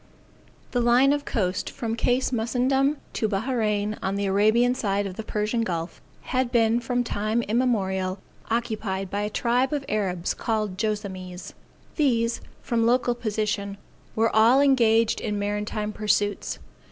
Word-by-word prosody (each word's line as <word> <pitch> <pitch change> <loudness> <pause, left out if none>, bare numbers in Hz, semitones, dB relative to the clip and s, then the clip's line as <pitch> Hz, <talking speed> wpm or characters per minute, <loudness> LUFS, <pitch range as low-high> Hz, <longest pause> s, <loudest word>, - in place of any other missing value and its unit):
The 245 - +1
line 245 +4 +5
of 290 0 -2
coast 185 -4 -1
from 225 -1 -3
Cape 245 +2 +1
Mussenndom 260 +4 +1 0.2
to 220 - 0
Bahrain, 215 -1 -1
on 190 +1 -1
the 200 0 -1
Arabian 215 +5 +3
side 205 -4 -1
of 190 -2 -5
the - - -4
Persian 215 +2 -1
Gulf, 170 -5 -3 0.2
had 255 -1 -1
been 230 0 +3
from 245 +1 -1
time 220 +1 -1
immemorial 195 -6 0 0.3
occupied 215 -5 -2
by 205 - -1
a 210 - -1
tribe 245 +5 +1
of 285 -2 -2
Arabs 185 -5 -1
called 215 -4 -2
Joassamees. 195 -4 -4 0.4
These, 235 -6 +1 0.2
from 230 -1 +1
local 245 0 +2
position, 210 -3 -2 0.4
were 225 0 +1
all 230 +5 +6
engaged 230 -5 +3
in 210 -1 -2
maritime 210 +1 -2
pursuits. 205 -1 0
220 Hz, 140 wpm, -25 LUFS, 205-240 Hz, 0.4 s, all